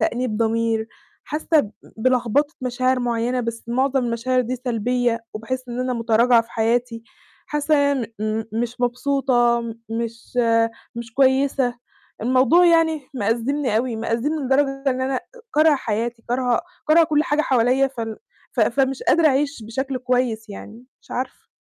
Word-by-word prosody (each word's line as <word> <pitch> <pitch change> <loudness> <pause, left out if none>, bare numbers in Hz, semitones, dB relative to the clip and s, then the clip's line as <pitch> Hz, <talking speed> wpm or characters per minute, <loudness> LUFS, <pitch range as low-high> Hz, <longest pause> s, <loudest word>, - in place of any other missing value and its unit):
تأنيب 240 -2 -1
ضمير، 225 0 0 0.4
حاسّة 310 +1 +1
ب 210 -5 -7 0.2
بلخبطة 255 +5 +1
مشاعر 255 +1 +1
معيّنة 245 +1 0
بس 230 -1 -5
مُعظم 260 +1 +1
المشاعر 240 +2 0
دي 250 +2 -3
سلبية 240 -1 -1
وباحس 255 +4 -4
إن 240 +1 -4
أنا 255 0 -1
مُتراجعة 230 +1 +4
في 230 - -21
حياتي، 230 +1 0 0.4
حاسّة 295 +1 0
يا 285 0 +3 0.3
م 215 +1 -1
مش 240 +2 -3
مبسوطة 245 -1 +2
م 230 -1 -5 0.2
مش 230 +1 -5 0.6
مش 235 -1 -7
كويسة، 265 -2 +2 0.4
الموضوع 260 +8 +4
يعني 320 -4 +2
مأزّمني 240 +2 0
أوي 235 0 -1
مأزّمني 235 +7 -1
لدرجة 270 +1 +1
إن 255 0 -2
أنا 260 +1 -1
آآ - - -2 0.3
كارهة 305 0 +5
حياتي 230 -1 -3
كارهة 245 -1 +1 0.3
كارهة 330 +2 +6
كل 305 -2 +2
حاجة 300 0 +1
حواليّا 255 0 +3
فال 230 -4 -5 0.4
ف - - -1
فمش 270 -1 +1
قادرة 330 0 +4
أعيش 280 -2 0
بشكل 260 +4 -3
كويس 250 -3 -1
يعني، 220 +4 -10 0.2
مش - - -24
عارفة. 255 +1 -5
250 Hz, 145 wpm, -22 LUFS, 230-270 Hz, 0.6 s, كارهة